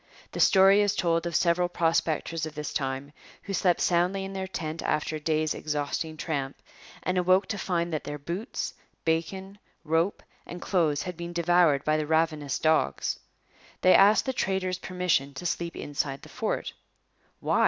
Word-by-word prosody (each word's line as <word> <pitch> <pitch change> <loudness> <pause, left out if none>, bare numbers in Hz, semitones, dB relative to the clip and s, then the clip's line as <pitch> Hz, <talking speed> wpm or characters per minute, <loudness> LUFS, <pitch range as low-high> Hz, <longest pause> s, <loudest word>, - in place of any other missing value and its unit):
The - - -6
story 195 +1 +6
is 205 0 +1
told 170 -2 +1
of 170 - -4
several 175 0 +2
prospectors 165 -1 0
of 155 - -10
this 150 0 -4
time, 135 +1 -3 0.3
who 200 - -5
slept 180 -1 +2
soundly 180 +3 +1
in 195 - -7
their 190 0 -3
tent 160 -3 -4
after 155 +1 -1
a - - -8
day's 155 0 0
exhausting 155 +1 -3
tramp, 140 -5 -3 0.4
and 185 0 +1
awoke 185 +2 +4
to 200 - -2
find 170 -2 -1
that 155 - -2
their 145 +1 -5
boots, 175 - -4 0.3
bacon, 190 +5 -2 0.2
rope, 165 +4 0 0.2
and 175 - -8
clothes 165 -7 +1
had 180 -1 -5
been 170 0 -6
devoured 170 -4 +3
by 155 0 +2
the 155 -1 -2
ravenous 155 -3 +1
dogs. 160 0 +1 0.6
They 185 - +6
asked 205 +2 +6
the 265 - -1
trader's 190 -5 -1
permission 180 -8 0
to 175 - -7
sleep 170 -1 -2
inside 140 -1 -3
the - - -12
fort. - - -3 0.7
'Why?' - - +1
170 Hz, 170 wpm, -27 LUFS, 155-185 Hz, 0.7 s, story